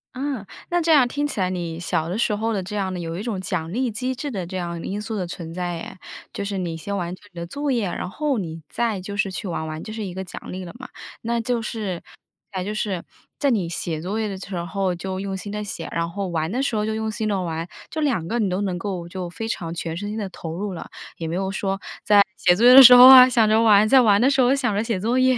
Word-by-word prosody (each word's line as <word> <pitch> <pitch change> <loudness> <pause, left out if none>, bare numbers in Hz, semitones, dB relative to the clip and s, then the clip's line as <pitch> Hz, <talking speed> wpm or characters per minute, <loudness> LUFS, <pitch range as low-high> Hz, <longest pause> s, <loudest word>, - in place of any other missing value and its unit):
嗯， 265 -6 -3 0.2
那 350 0 +2
这 330 -1 +1
样 270 -5 +6
听 290 +3 -2
起 270 -8 -4
来， 185 -1 +1
你 170 -3 -4
小 165 -1 -1
的 180 - -3
时 215 -3 +1
候 225 +2 -1
的 195 - -1
这 190 +3 -6
样 190 -2 -1
的， 180 - -4
有 165 0 -4
一 205 - -5
种 210 -6 -3
奖 175 -2 -3
励 250 +1 0
机 255 +4 -2
制 285 +3 -5
的 190 -8 -4
这 185 +2 -5
样 170 -1 -4
因 205 +2 -4
素 220 0 -4
的 185 -3 -2
存 170 -1 -7
在 175 -1 -3
诶。 185 - -9 0.3
就 200 - -4
是 200 -1 -3
你 170 -2 -3
先 200 +5 -4
完 175 -1 -3
成 205 - -20
你 170 - -8
的 170 - -5
作 285 +6 -2
业， 230 -5 +1
然 175 - -4
后 290 +5 -1
你 165 -4 -5
再 225 -5 -1
就 200 +2 -6
是 195 -2 0
去 190 - -5
玩 160 -2 -3
玩， 155 0 -5
就 215 - -7
是 220 -1 -5
一 180 - -6
个 190 +1 -5
奖 180 - -9
励 185 0 -5
了 170 - -8
嘛。 255 - -9 0.3
那 235 0 -1
就 235 -1 -1
是 205 -6 -4 0.5
那 185 -1 -2
就 210 +2 -4
是 195 -5 -2 0.4
在 280 - +2
你 200 -8 +1
写 165 -1 -3
作 195 +6 -3
业 215 - -1
的 195 -2 -5
时 190 0 -7
候， 185 +2 -1
就 185 +2 -5
用 195 -1 -3
心 200 +2 -6
地 210 0 -4
写， 205 - -5
然 170 0 -1
后 195 +3 -4
玩 165 0 -2
的 255 +3 -1
时 255 -5 -1
候 210 0 0
就 220 - -1
用 220 0 -2
心 215 0 -2
地 195 -3 0
玩。 165 -1 -3 0.2
就 315 - -5
两 235 - 0
个 235 - -1
你 215 -4 +1
都 185 +3 -1
能 185 -3 -1
够 175 -2 -4
就 180 -1 -5
非 225 +4 -5
常 170 -7 -4
全 165 -1 -4
身 205 +2 -4
心 220 - -4
地 200 -2 -3
投 165 -3 -7
入 200 +1 -4
了， 165 - -7 0.3
也 165 - -4
没 165 - -3
有 190 +1 -1
说 195 0 -2 0.2
在 205 -1 +6 0.2
写 175 - +4
作 225 - 0
业 250 - +9
的 270 - +12
时 250 0 +11
候 250 +1 +11
啊， 255 -1 +11
想 225 -4 +3
着 220 +1 +4
玩， 215 -1 +5
在 265 -1 +7
玩 205 -2 +4
的 265 - +5
时 270 -2 +3
候 250 +2 +4
想 250 -7 0
着 210 - +1
写 225 -5 -2
作 235 +6 0
业。 255 -1 +4
200 Hz, 310 characters per minute, -23 LUFS, 180-230 Hz, 0.5 s, 的